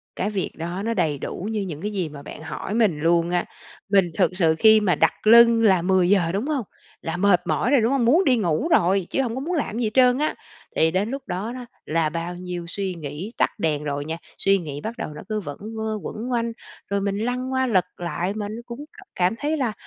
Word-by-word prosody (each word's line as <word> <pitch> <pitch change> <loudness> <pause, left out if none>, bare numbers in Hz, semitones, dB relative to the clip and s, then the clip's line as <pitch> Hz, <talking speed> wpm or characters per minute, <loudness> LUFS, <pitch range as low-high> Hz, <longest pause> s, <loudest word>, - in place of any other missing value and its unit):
Cái 195 - -1
việc 200 -3 -2
đó 170 +4 -4
nó 230 - 0
đầy 160 -8 0
đủ 185 - -5
như 215 -2 -1
những 170 -5 -5
cái 210 - -3
gì 185 -6 -2
mà 145 -1 -10
bạn 140 - -10
hỏi 160 +5 -5
mình 215 -9 +2
luôn 170 +2 +2
á. 175 0 0 0.4
Mình 195 -2 +5
thực 185 -2 +3
sự 160 -4 +3
khi 220 0 +7
mà 200 -4 +2
đặt - - +1
lưng 230 0 +7
là 190 -5 +5
10:00, 180 -1 +3
đúng 200 +6 -1
hông? 285 -6 -1 0.4
Là 165 +1 -3
mệt 180 -2 +4
mỏi 245 - +1
rồi, 275 -5 +5
đúng 230 - +2
hông? 270 -4 +2
Muốn 310 +11 +5
đi 260 -7 +3
ngủ 180 - 0
rồi, 190 - +3
chứ 275 - 0
hông 240 -3 -2
có 260 - -3
muốn 345 +5 -2
làm 275 -8 -2
gì 240 - -1
hết 220 - +1
trơn 250 -1 +5
á. 305 - 0 0.4
Thì 160 0 +3
đến 190 +5 0
lúc 275 +1 -4
đó 195 +5 -3
đó, 250 -1 -7 0.2
là 160 0 +1
bao 170 +2 -4
nhiêu 180 -1 -6
suy 190 +1 -3
nghĩ 160 +6 -6
tắt - - +3
đèn 150 -5 0
rồi 145 -1 -3
nha, 160 +2 -4 0.2
suy 195 0 +3
nghĩ 150 -5 -6
bắt 230 +2 -5
đầu - - -4
nó 150 - -9
cứ 215 0 -1
vẩn 145 -8 -7 0.2
vơ, 220 0 -2
quẩn 240 +4 -5
quanh, 235 -1 0 0.4
rồi 200 0 0
mình 200 0 -1
lăn 250 +4 -2
qua, 260 0 +1
lật 190 -7 +3
lại 175 +2 -2
mà 210 -1 -3
nó 220 +2 -6
cũng 245 +4 -8
c - - -33 0.3
cảm 180 +2 +2
thấy 305 +2 -1
là, 250 -6 -1
200 Hz, 250 wpm, -23 LUFS, 170-235 Hz, 0.4 s, khi